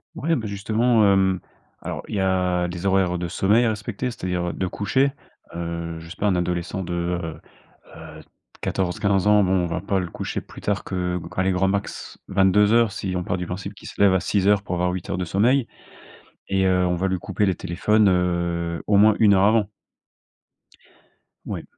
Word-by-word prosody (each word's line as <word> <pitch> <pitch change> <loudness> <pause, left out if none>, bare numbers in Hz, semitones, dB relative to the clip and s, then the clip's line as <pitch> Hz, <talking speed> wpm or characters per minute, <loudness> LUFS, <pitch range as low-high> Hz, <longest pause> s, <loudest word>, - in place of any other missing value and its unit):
Ouais, 165 +2 0
bah, 110 - -3
justement, 110 +3 +2
hem, 95 -1 +2 0.4
alors - - -5
il - - -4
y - - 0
a 90 -2 +1
les 90 +2 -6
horaires 95 -2 +2
de 85 -1 -4
sommeil 105 +8 +3
à 115 - +2
respecter, 110 +3 -3
c'est-à-dire, 90 -5 -3
heu, - - -5
de 95 - -2
coucher. 130 +9 0 0.4
Heu, 85 -1 -4
je 80 0 -11
sais - - -10
pas 105 - 0
un 95 - +2
adolescent 90 +1 -2
de, 90 - -6
heu 85 -2 -3 0.6
heu - - -11 0.4
14-15 95 +1 0
ans, 105 -1 +5
bon, 95 - 0
on - - -2
va 85 +2 -3
pas 100 -1 0
le 90 - -3
coucher - - -4
plus - - -13
tard 100 -1 -2
que 90 -1 -2
que, 90 +2 -7
allez 95 0 +2
grand 95 +1 +1
max, 100 +1 -3
22:00 100 +3 +4
si 95 -2 -4
on 90 - -2
part 90 - -1
du 90 - -4
principe 100 +3 -6
qu'il - - -11
se - - -13
lève 100 -2 +6
à 95 - +2
6:00 100 0 +2
pour 90 - -3
avoir 90 +1 0
8 90 -1 -6
heures 95 - -2
de 90 - -2
sommeil. 115 +9 +2 0.8
Et, 95 0 +1
heu, 90 -1 +3
on 90 - +1
va 95 +3 -1
lui 95 - -1
couper 100 +3 -1
les 95 - +2
téléphones, 105 +5 +2
heu, 85 -2 0
au 105 - +4
moins 105 +1 +6
1 105 -3 +6
heure 95 - +3
avant. 105 -1 +3 1.8
Ouais. - - -5
95 Hz, 205 wpm, -23 LUFS, 90-105 Hz, 1.8 s, lève